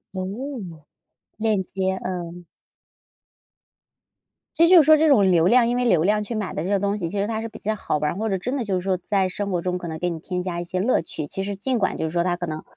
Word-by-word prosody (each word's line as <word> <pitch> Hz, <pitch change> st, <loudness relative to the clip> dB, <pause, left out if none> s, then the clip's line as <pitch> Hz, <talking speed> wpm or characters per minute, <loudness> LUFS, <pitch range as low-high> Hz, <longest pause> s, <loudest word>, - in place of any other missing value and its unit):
哦， 185 Hz, -, -2 dB, 1.1 s
链 215 Hz, -3 st, +1 dB
接， 190 Hz, 0 st, -2 dB
嗯。 175 Hz, -1 st, -5 dB, 2.1 s
其 335 Hz, -, +4 dB
实 335 Hz, -, +6 dB
就 360 Hz, -3 st, +9 dB
是 -, -, 0 dB
说 310 Hz, 0 st, +8 dB
这 310 Hz, 0 st, +3 dB
种 205 Hz, -9 st, +5 dB
流 170 Hz, -1 st, +4 dB
量 235 Hz, +3 st, +5 dB
因 240 Hz, -, 0 dB
为 250 Hz, -, +1 dB
流 180 Hz, -10 st, +3 dB
量 210 Hz, +1 st, +2 dB
去 235 Hz, -, -6 dB
买 210 Hz, -5 st, -3 dB
的 155 Hz, -, -3 dB
这 185 Hz, -, -3 dB
些 200 Hz, -1 st, +2 dB
东 200 Hz, +1 st, 0 dB
西， 170 Hz, -5 st, -3 dB
其 205 Hz, -, -3 dB
实 200 Hz, -, 0 dB
它 220 Hz, -1 st, -2 dB
是 225 Hz, -, -5 dB
比 -, -, -12 dB
较 215 Hz, +1 st, -2 dB
好 190 Hz, -, -2 dB
玩 150 Hz, +1 st, -1 dB
儿， -, -, -8 dB
或 220 Hz, +1 st, -1 dB
者 190 Hz, -, 0 dB
真 250 Hz, +9 st, -3 dB
的 260 Hz, -, -1 dB
就 200 Hz, -3 st, -1 dB
是 180 Hz, -, +1 dB
说 190 Hz, 0 st, 0 dB
在 190 Hz, +1 st, 0 dB
生 200 Hz, +2 st, -4 dB
活 175 Hz, -, 0 dB
中， 180 Hz, +1 st, -1 dB
可 175 Hz, -1 st, -6 dB
能 160 Hz, 0 st, -5 dB
给 180 Hz, -, 0 dB
你 165 Hz, -, -4 dB
添 180 Hz, +2 st, -4 dB
加 175 Hz, -2 st, -3 dB
一 -, -, -3 dB
些 185 Hz, +1 st, -3 dB
乐 220 Hz, -2 st, +2 dB
趣。 155 Hz, -2 st, -6 dB
其 195 Hz, -, -4 dB
实 200 Hz, -1 st, -4 dB
尽 250 Hz, +4 st, -1 dB
管 195 Hz, -, 0 dB
就 -, -, -2 dB
是 160 Hz, -, -3 dB
说 170 Hz, 0 st, +1 dB
它 175 Hz, -1 st, 0 dB
可 175 Hz, -, -4 dB
能， 155 Hz, -1 st, -5 dB
190 Hz, 300 characters per minute, -23 LUFS, 175-215 Hz, 2.1 s, 就